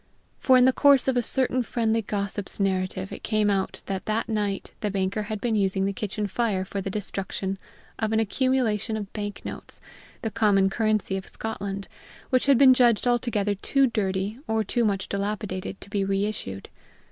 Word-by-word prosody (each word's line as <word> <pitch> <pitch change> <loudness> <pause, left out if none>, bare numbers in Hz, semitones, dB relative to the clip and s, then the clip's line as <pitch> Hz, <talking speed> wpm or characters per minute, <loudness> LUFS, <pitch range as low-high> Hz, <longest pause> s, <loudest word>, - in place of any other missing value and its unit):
For, 260 -1 +5
in 250 - +6
the 260 - +5
course 280 -2 +5
of 265 - +2
a 245 - +3
certain 255 +1 +1
friendly 225 -1 0
gossip's 200 -1 -3
narrative, 190 -1 -1
it - - -7
came 215 -2 +1
out 195 -1 -2
that 190 -1 -4
that 220 +2 0
night 210 -3 -2
the 210 - -1
banker 195 +1 -1
had 210 0 -4
been 235 +1 -1
using 195 -2 +1
the 200 - -1
kitchen 210 -1 -3
fire 200 -2 -1
for 195 +1 -4
the 195 - -4
destruction 195 -1 -3 0.4
of 220 -1 0
an 220 - +2
accumulation 225 -1 +1
of 205 -2 -7
bank 205 -1 -5
notes, - - -7 0.4
the 225 - -2
common 200 -3 +3
currency 215 -3 0
of 190 - -7
Scotland, 200 -3 -5 0.4
which 255 +1 +2
had 275 -3 +6
been 265 0 +8
judged 240 -3 +3
altogether 235 -4 +1
too 275 +7 +2
dirty, 205 -1 -1
or 220 0 +1
too 235 +4 0
much 200 -3 0
dilapidated, 200 -1 -3
to - - -10
be 200 -1 0
reissued. 195 - -2
210 Hz, 180 wpm, -26 LUFS, 195-230 Hz, 0.4 s, been